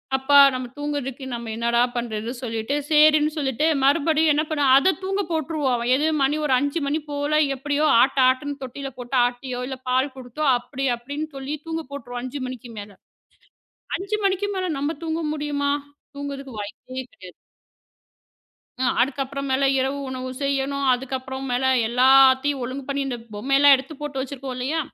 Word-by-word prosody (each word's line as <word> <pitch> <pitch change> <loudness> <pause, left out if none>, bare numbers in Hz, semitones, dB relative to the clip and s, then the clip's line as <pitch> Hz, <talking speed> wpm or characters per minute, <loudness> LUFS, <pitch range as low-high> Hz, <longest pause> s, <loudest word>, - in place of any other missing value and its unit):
அப்பா, 265 +2 +4 0.2
நம்ம 255 -1 -4
தூங்குறதுக்கு 285 -2 -4
நம்ம 235 -1 -5
என்னடா 235 +1 +1
பண்றது 230 -1 -3
சொல்லிட்டு 225 +2 -2
சேரின்னு 305 0 +5
சொல்லிட்டு 275 0 0 0.2
மறுபடியும் 305 +3 +3
என்ன 300 +2 +1
பண்ண 290 -2 +1
அத 370 +7 +4
தூங்க 390 +1 -1
போட்ருவோம். 295 -6 -1
எது 295 +4 +1 0.2
மணி 290 +3 +2
ஒரு 275 - +2
5 285 +4 -1
மணி 300 +3 0
போல 290 +1 0 0.2
எப்டியோ 290 +3 0 0.2
ஆட்டு, 270 +1 +2
ஆட்டுன்னு 285 +2 0
தொட்டியில 270 +1 -6
போட்டு 250 +1 -3
ஆட்டியோ, 245 0 -4
இல்ல 265 - -5
பால் 260 +2 +1
குடுத்தோ 260 +4 -5
அப்டி, 270 +2 -5
அப்டின்னு 285 +6 -5
சொல்லித் 285 +3 -6
தூங்க 325 0 -3
போட்ருவோம் 245 -3 -6
5 255 +2 -5
மணிக்கு 250 -2 -8
மேல. 205 0 -9 1.1
5 395 +3 -3
மணிக்கு 390 +1 +1
மேல 370 - -1
நம்ம 290 +4 -2
தூங்க 325 0 -2
முடியுமா? 290 -1 -1 0.4
தூங்கறதுக்கு 275 -3 -6
வாய்ப்பே 255 +5 -7
கிடையாது. 185 -1 -13 1.5
அ. - - +2 0.2
அதுக்கு 270 +2 0
அப்புறம் 275 +1 -5
மேல 265 +1 +1 0.2
இரவு 270 +2 -1
உணவு 255 0 -5
செய்யணும். 275 0 -1
அதுக்கு 265 +1 -3
அப்புறம் 265 +1 -6
மேல 250 +2 0 0.2
எல்லாத்தையும் 265 +2 +5
ஒழுங்கு 260 +3 -5
பண்ணி, 280 0 -1
இந்தப் 240 -3 -6
பொம்மையெல்லாம் 275 +5 +5
எடுத்துப் 270 +3 -8
போட்டு 290 -2 -4
வச்சிருக்கோம் 265 -1 -6
இல்லையா? 275 +6 -1
275 Hz, 160 wpm, -23 LUFS, 255-290 Hz, 1.5 s, சேரின்னு